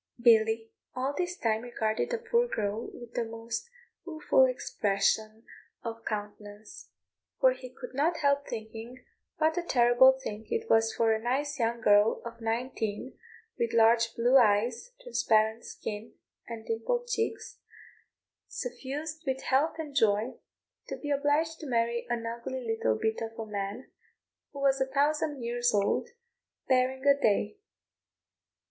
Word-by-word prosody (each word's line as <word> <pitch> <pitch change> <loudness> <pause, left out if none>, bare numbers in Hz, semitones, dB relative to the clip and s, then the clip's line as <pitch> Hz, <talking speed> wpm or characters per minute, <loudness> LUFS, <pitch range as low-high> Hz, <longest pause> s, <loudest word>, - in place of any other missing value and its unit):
Billy 225 -1 +4 0.2
all 260 +2 -1
this 360 +3 -2
time 220 -1 0
regarded 220 -3 -2
the 480 - -1
poor 470 +1 +1
girl 215 - -3
with 240 -1 -12
a - - +1
most 230 - -5 0.3
rueful 310 -5 +3
expression 220 -3 0 0.4
of 230 -1 -6
countenance; 205 0 -7 0.5
for 260 -3 +6
he 255 0 -8
could 250 0 -10
not 315 +5 +1
help 280 -1 +1
thinking 225 +2 -8 0.3
what 315 +2 +2
a - - -1
terrible 250 -3 +5
thing 220 -5 -7
it 455 0 -2
was 225 0 +4
for 225 -1 +2
a 220 - -2
nice 280 +4 -1
young 235 0 0
girl 205 0 +4
of 235 0 -8
nineteen, 225 0 -3 0.4
with 235 -1 0
large 230 0 +4
blue 245 +3 +4
eyes, 230 - +2
transparent 220 - +1
skin, 215 +1 -7 0.3
and 230 -2 -7
dimpled 230 - -1
cheeks, 450 -2 -3 0.9
suffused 310 - -5
with 265 0 -1
health 285 +5 +2
and 300 -3 -6
joy, 215 +1 +2 0.5
to - - -5
be 290 - -5
obliged 295 +3 +1
to 310 - -7
marry 235 0 0
an 235 -1 -2
ugly 235 +2 -5
little 225 - 0
bit 220 - -1
of 225 0 -6
a 225 - -4
man, 205 +3 -5 0.6
who 280 - -8
was 270 -1 +2
a 265 - +2
thousand 290 -1 0
years 240 +1 +1
old, 205 - +1 0.6
barring 260 +1 +1
a 280 0 +6
day. 220 - +1
240 Hz, 145 wpm, -29 LUFS, 225-280 Hz, 0.9 s, for